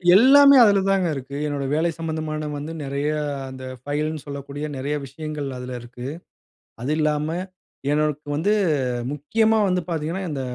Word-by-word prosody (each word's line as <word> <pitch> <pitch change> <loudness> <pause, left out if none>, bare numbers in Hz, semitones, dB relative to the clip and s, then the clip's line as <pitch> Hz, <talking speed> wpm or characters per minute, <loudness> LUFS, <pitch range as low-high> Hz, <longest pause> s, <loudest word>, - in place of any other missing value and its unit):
எல்லாமே 280 +5 +8
அதுல 200 -2 +5
தாங்க 190 -3 +2
இருக்கு. 135 +1 -7
என்னோட 145 -1 -2
வேலை 165 +3 +2
சம்மந்தமான 155 -2 -3
வந்து, 150 +3 -5
நெறையா 140 +2 -1 0.3
அந்த 130 0 -9 0.2
ஃபைல்ன்னு 150 +1 -2
சொல்லக்கூடிய, 140 +1 -6
நெறைய 145 +3 -2
விஷயங்கள் 150 0 -5
அதுல 125 0 -6
இருக்கு. 120 +1 -8 0.7
அது 135 - -1
இல்லாம 150 -1 +1 0.7
எனக்கு 150 -1 0
வந்து 195 +8 +2 0.6
முக்கியமா 220 +10 +2
வந்து 180 0 +1
பார்த்தீங்கன்னா, 165 +4 -2
இந்த 140 - -3
150 Hz, 135 wpm, -23 LUFS, 140-165 Hz, 0.7 s, எல்லாமே